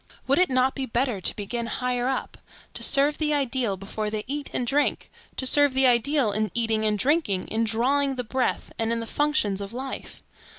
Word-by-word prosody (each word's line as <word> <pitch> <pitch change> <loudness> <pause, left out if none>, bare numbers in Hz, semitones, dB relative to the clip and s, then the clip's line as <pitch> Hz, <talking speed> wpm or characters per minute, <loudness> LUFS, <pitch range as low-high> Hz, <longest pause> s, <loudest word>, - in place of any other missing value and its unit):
Would 275 +5 +2
it 365 - +4
not 255 0 +2
be 265 -1 -3
better 240 -4 -1
to - - 0
begin 230 +3 -4
higher 250 +1 -1
up,—to 265 - -6
serve 285 +2 +3
the 300 -1 +1
ideal 255 -7 0
before 210 +2 -4
they 210 0 -3
eat 285 +2 -4
and 250 - -1
drink; 285 +4 0 0.2
to 260 - -3
serve 285 0 +4
the 265 0 +4
ideal 250 0 +3
in 215 +1 0
eating 225 -2 +1
and 210 -1 +1
drinking, 255 - +1
in 225 +1 0
drawing 270 +5 +1
the 250 - -3
breath, 255 +3 -2
and 225 0 0
in 230 - 0
the 230 - -4
functions 225 -8 0
of 200 +2 -6
life? 265 +2 -6
250 Hz, 200 wpm, -25 LUFS, 220-275 Hz, 0.2 s, it